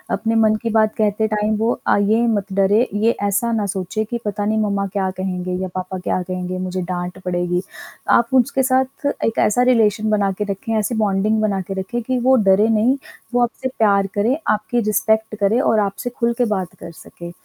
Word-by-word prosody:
अपने 225 0 -1
मन 220 -1 +4
की 230 - -1
बात 220 -1 +2
कहते 215 0 +1
टाइम 215 0 0
वो 225 +2 +1 0.2
अ, - - +4
ये 215 +3 +2
मत 205 -3 -1
डरे, 200 +5 +3
ये 220 +3 +2
ऐसा 220 +4 0
ना 220 -3 0
सोचे 195 +3 -3
कि 240 - -2
पता 205 0 -2
नहीं 220 +1 0
मम्मा 200 -1 0
क्या 190 -2 0
कहेंगे 185 -1 -3
या 190 - -2
पापा 185 0 -4
क्या 180 0 -1
कहेंगे 185 0 -4
मुझे 185 0 -3
डाँट 180 0 -4
पड़ेगी। 175 0 -1 0.6
आप 235 0 +1
उसके 265 +1 -1
साथ 260 +2 0 0.2
एक 225 - -1
ऐसा 230 +4 +1
रिलेशन 215 -2 +2
बना 205 -2 +1
के - - +3
रखें 200 +3 -4
ऐसी 215 +3 -1
बॉन्डिंग 210 +2 +1
बना 200 -3 0
के 195 - -6
रखें 235 +6 -3
कि 255 +2 -1
वो 260 +2 +4
डरे 195 +3 +4
नहीं 225 +5 +2 0.4
वो 245 - +2
आपसे 240 +2 -2
प्यार 200 -3 +3
करे 225 +7 +1
आपकी 215 +3 0
रिस्पेक्ट 220 +1 +1
करे 210 +4 +2
और 225 -5 +2
आपसे 205 +4 -2
खुल 235 -1 -1
के 245 - +2
बात 185 -2 -5
कर 170 - -9
सके। 170 +1 -11
210 Hz, 205 wpm, -20 LUFS, 195-225 Hz, 0.6 s, मन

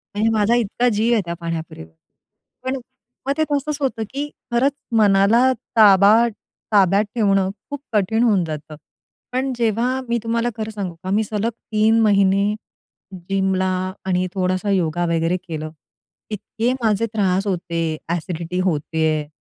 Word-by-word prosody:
आणि 215 +2 +1
माझा 220 +1 +2
इतका 240 +1 +1
जीव 225 +2 +1
आहे 220 - +3
त्या 170 - -3
पाणीपुरीवर. 160 - -6 0.7
पण 260 +1 -1
अ, - - -4 0.5
मग 275 - +2
ते 315 - +3
तसंच 290 +1 -1
होतं, 255 -5 -1
की 285 +2 -4 0.2
खरंच 265 +4 +2 0.2
मनाला 210 +5 +5 0.3
ताबा 200 -1 +7 0.6
ताब्यात 200 +1 +4
ठेवणं 195 -4 +2 0.2
खूप 285 -1 -5
कठीण 220 +3 +2
होऊन 205 -6 +3
जातं. 155 -1 -7 0.6
पण 260 +2 -1
जेव्हा 240 +3 0
मी 235 - +2
तुम्हाला 230 +1 0
खरं 220 0 -4
सांगू 195 -5 -5
का, 185 - -4
मी 210 +3 +2
सलग 215 +2 -1 0.2
3 220 +1 +3
महिने 200 -1 +3 0.8
जिमला 190 -1 +1 0.4
आणि 185 -1 0
थोडासा 185 +1 -1
योगा 175 -2 +1
वगैरे 165 +1 +1
केलं. 155 -1 -5 0.6
इतके 225 +3 -2
माझे 220 0 +2
त्रास 195 -1 +1
होते, 165 -3 -2
अ‍ॅसिडिटी 170 +1 -3
होत 185 -5 +1 0.2
आहे 155 -2 +1
200 Hz, 145 wpm, -21 LUFS, 180-230 Hz, 0.8 s, ताबा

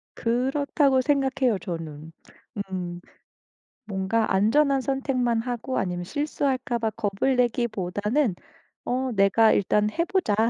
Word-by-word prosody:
그렇다고 265 +3 +1
생각해요, 265 -4 +1
저는. 160 -4 -7 0.6
음. 175 -2 -4 0.9
뭔가 195 +3 0
안전한 270 +8 +3
선택만 255 -3 0
하고 245 +2 -3
아니면 175 -1 -2
실수할까 275 - -1
봐 225 -1 0
겁을 220 +4 -1
내기보다는 225 -1 0 0.5
어 255 +1 -1
'내가 210 +2 +4
일단 210 +1 +2
해 335 +10 -1
보자. 360 - 0
235 Hz, 250 characters per minute, -25 LUFS, 200-265 Hz, 0.9 s, 내가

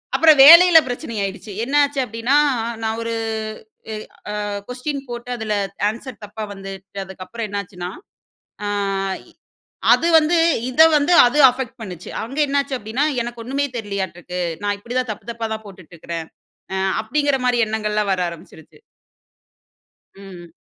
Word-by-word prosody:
அப்புறம் 310 +1 +6
வேலையில 340 +1 +10
பிரச்சனை 245 -2 -5
ஆயிடுச்சு. 195 +2 -6
என்னாச்சு 285 +2 +2
அப்டீன்னா, 230 +3 -1 0.5
நான் 220 0 -2
ஒரு 230 0 -3 0.8
அ - - -4
ஏ - - -3 0.5
அ - - -3 0.2
கொஸ்டின் 275 +3 -4
போட்டு 240 +1 -7
அதில 220 -2 -3 0.4
ஆன்சர் 235 0 -9
தப்பா 210 +1 -8
வந்து 195 -1 -8 0.3
அதுக்கப்புறம் 190 +4 -7
என்னாச்சுன்னா, 180 -3 -5 0.7
ஆ - - -2 1.3
அது 335 - +2
வந்து 320 +2 +3 0.3
இத 300 +5 +3 0.2
வந்து 295 +5 +2
அது 245 +5 +1
அஃபெக்ட் 255 0 -6
பண்ணுச்சு. 180 -5 -8
அங்க 265 +6 -8
என்னாச்சு 280 -1 0
அப்டீன்னா, 240 +6 -1 0.2
"எனக்கு 240 0 -7
ஒன்னுமே 275 +4 -1
தெரியலையாட்ருக்கு. 190 -4 -4 0.2
நான் 205 0 -1
இப்படி 240 +4 -8
தான் 250 -3 -2
தப்பு 205 - -9
தப்பா 230 -1 -4
தான் 220 0 -6
போட்டுட்ருக்கிறேன்" 170 -4 -8 0.5
அ - - -1 0.3
அப்டீங்கிற 285 +3 0
மாரி 245 -1 +2
எண்ணங்கள் 215 -1 -2
எல்லாம் 210 -2 +1
வர 185 - -2
ஆரம்பிச்சுடுச்சு. 165 - -14 1.3
ம். 185 -4 -12
230 Hz, 140 wpm, -20 LUFS, 200-270 Hz, 1.3 s, வேலையில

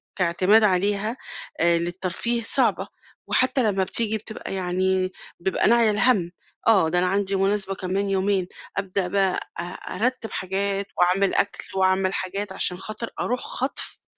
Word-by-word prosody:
كاعتماد 185 +5 +3
عليها 205 +4 +1 0.4
آآ، 170 0 +4
للترفيه 185 +7 -1
صعبة، - - +3 0.4
وحتى 255 0 +3
لمّا 190 -1 0
بتيجي 220 +3 +3
بتبقى 215 -2 -7
يعني 185 0 0 0.3
بيبقى 190 +2 0
ناعية 230 -1 +4
الهَم، 205 -5 +2 0.4
آه، 195 -8 +4
ده 175 +2 +2
أنا 180 - +1
عندي 195 +1 +1
مناسبة 195 0 +1
كمان 190 +2 -2
يومين، 195 -1 0 0.3
أبدأ 195 -1 -1
بقى 195 0 +1 0.6
أرتّب 245 +1 -1
حاجات 195 +1 -2
وأعمل 185 +2 +2
أكل 200 - 0
وأعمل 190 0 +1
حاجات 195 +1 -3
علشان 180 -1 +2
خاطر 215 +4 -4
أروح 250 +1 -1
خَطف 260 +2 -4
195 Hz, 135 wpm, -23 LUFS, 185-210 Hz, 0.6 s, آآ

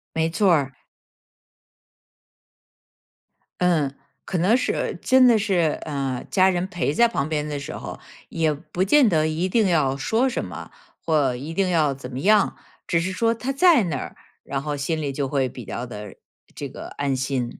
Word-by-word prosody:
没 160 0 +1
错 190 +3 +2
儿。 135 -4 -1 2.8
嗯， 160 -6 +2 0.3
可 185 - -3
能 185 +7 +3
是 255 - -1
真 260 -1 +5
的 235 -2 +5
是 185 -7 +1
呃， 135 -4 -3
家 190 -1 +4
人 180 -1 0
陪 175 -6 -2
在 235 +8 +5
旁 140 -10 -1
边 150 -1 -2
的 145 -1 -4
时 145 +3 -7
候， - - -7 0.3
也 160 -2 +1
不 155 +4 -3
见 260 +7 +5
得 155 -4 +2
一 165 +4 -1
定 220 0 +2
要 145 -6 +2
说 230 - +1
什 - - -3
么， - - -9 0.3
或 145 -6 +2
一 145 +6 -6
定 190 +1 +1
要 155 -5 +2
怎 130 -1 -9
么 130 0 -6
样。 210 +6 +3 0.3
只 170 - +2
是 185 +3 -2
说 230 +4 +1
他 250 +4 -3
在 295 - +5
那 160 -7 -2
儿， - - -7 0.3
然 135 0 -4
后 150 -1 -3
心 155 +3 -2
里 140 -2 -2
就 140 0 -2
会 130 -1 0
比 125 - -10
较 120 - -5
地 105 -4 -9 0.4
这 - - -5
个 - - -9
安 140 -1 0
心。 130 -2 -3
155 Hz, 195 characters per minute, -23 LUFS, 140-190 Hz, 2.8 s, 真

